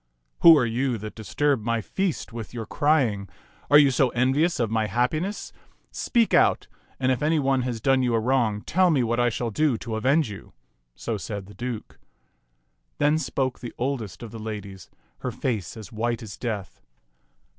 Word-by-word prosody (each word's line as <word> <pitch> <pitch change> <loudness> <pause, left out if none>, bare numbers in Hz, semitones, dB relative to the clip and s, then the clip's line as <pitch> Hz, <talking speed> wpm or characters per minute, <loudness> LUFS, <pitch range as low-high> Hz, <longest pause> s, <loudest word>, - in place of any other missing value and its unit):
" - - -48
Who 165 -2 +9
are 130 - +3
you 120 +2 0
that 110 0 -7
disturb 135 +4 0
my 115 +1 0
feast 175 - -3
with 115 +1 -7
your 115 -2 -4
crying? 120 -8 +1 0.4
Are 145 - +8
you 145 -2 +6
so 130 0 +3
envious 135 +8 +1
of 115 -3 0
my 110 -1 +1
happiness? 155 - -1 0.4
Speak 235 -3 +1
out, - - +4 0.3
and 130 0 +2
if 130 - -1
any 155 +2 +2
one 135 -2 +2
has 120 -2 -3
done 135 +3 +3
you 120 -2 +1
a - - +3
wrong, 115 -3 +1
tell 185 +2 +3
me 140 -7 +3
what 120 +1 0
I 120 0 +3
shall 120 0 -3
do 145 +1 +1
to 110 0 -5
avenge 135 +6 +2
you." 100 - -11 0.4
So 115 -2 -3
said 100 +1 -6
the 100 - -13
Duke. 120 -2 -6 1.0
Then 150 +2 +3
spoke 130 -4 -2
the 120 - -8
oldest 120 - -3
of 115 - -8
the 115 - -8
ladies, 105 -3 -7 0.3
her - - -3
face 110 -5 -3
as 110 +1 -10
white 115 +1 -2
as 105 -3 -8
death. 105 -6 -5
120 Hz, 190 wpm, -25 LUFS, 110-135 Hz, 1.0 s, Who